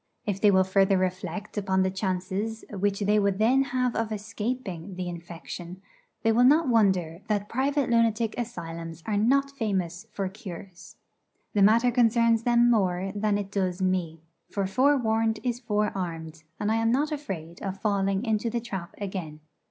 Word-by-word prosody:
If 200 -2 -2
they 210 - +6
will 190 -1 +5
further 195 +1 +3
reflect 185 +2 -3
upon 190 -1 +1
the 190 - 0
chances 190 +3 -3
which 200 0 -1
they 210 +1 +3
would 200 -2 +1
then 255 +6 +3
have 250 -2 -1
of 225 -1 -1
escaping 210 -4 -4
the 180 0 -4
infection, 175 +1 -8 0.4
they 225 - +4
will 235 +2 +4
not 300 +4 +5
wonder 190 -8 +2
that 205 -1 0
private 275 +3 0
lunatic 230 -1 +2
asylums 165 -8 -6
are 215 - -1
not 275 +7 +2
famous 195 -6 -2
for 195 -2 -2
cures. 180 -4 -10 0.6
The 205 - +2
matter 230 +5 +5
concerns 230 -1 +3
them 240 0 +4
more 190 -3 +1
than 205 0 +1
it 200 -1 -5
does 185 -2 -1
me; 180 -4 -1 0.3
for 200 -1 -1
forewarned 225 -1 +2
is 245 -2 -1
forearmed, 175 -8 -3
and 210 - 0
I 225 - +2
am 225 0 +2
not 290 +5 +1
afraid 180 - -6
of 195 -1 -4
falling 195 0 0
into 220 0 0
the 235 - -1
trap 190 -7 -6
again. 185 -7 -5
205 Hz, 165 wpm, -27 LUFS, 185-230 Hz, 0.6 s, they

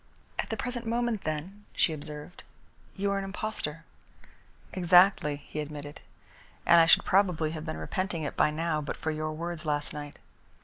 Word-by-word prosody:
"At - - -1
the - - -2
present 245 -2 -4
moment, 235 -2 0
then," 170 +7 -4
she 160 - +3
observed, 150 +3 -8 0.5
"you 200 0 0
are 200 - +1
an - - -3
impostor." 195 -5 -4 0.9
"Exactly," 180 -4 +5
he 155 - -5
admitted, 145 -1 -6 0.7
"and 170 -1 +8
I 165 - +5
should - - +6
probably 180 -5 +3
have 160 -1 -6
been 80 - -3
repenting 165 - -2
it 145 - -3
by - - +4
now 155 0 -1
but 145 - -4
for 160 - -2
your 155 0 -2
words 170 +1 -4
last 145 -2 -1
night." 145 -1 -7
165 Hz, 170 wpm, -29 LUFS, 150-195 Hz, 0.9 s, and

